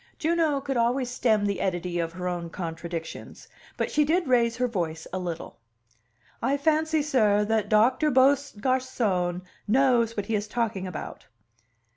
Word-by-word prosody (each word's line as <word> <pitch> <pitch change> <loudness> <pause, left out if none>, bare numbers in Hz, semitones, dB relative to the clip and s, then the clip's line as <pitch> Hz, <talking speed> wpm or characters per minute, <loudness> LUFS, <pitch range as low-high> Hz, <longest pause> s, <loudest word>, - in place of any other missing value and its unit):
Juno 320 -3 +1
could 270 -2 -2
always 245 +2 +1
stem 220 -4 +2
the 200 -2 -1
eddy 175 -1 -2
of 165 -1 -2
her 180 +1 -4
own 175 -1 -3
contradictions 165 -1 -6 0.3
but - - -1
she 300 - +3
did 330 +2 +1
raise 235 -2 +2
her 250 0 +1
voice 165 -8 -3
a 185 - -1
little. 170 -2 -6 0.8
"I 270 +4 +1
fancy, 315 +1 +1
sir, 215 -8 +3
that 220 0 0
Doctor 255 +8 +4
Beaugarcon 255 -8 +1 0.2
knows 235 -1 +3
what 205 - -1
he 225 - -3
is 210 0 -1
talking 215 -4 -2
about." 180 -4 -7
230 Hz, 150 wpm, -26 LUFS, 185-265 Hz, 0.8 s, Doctor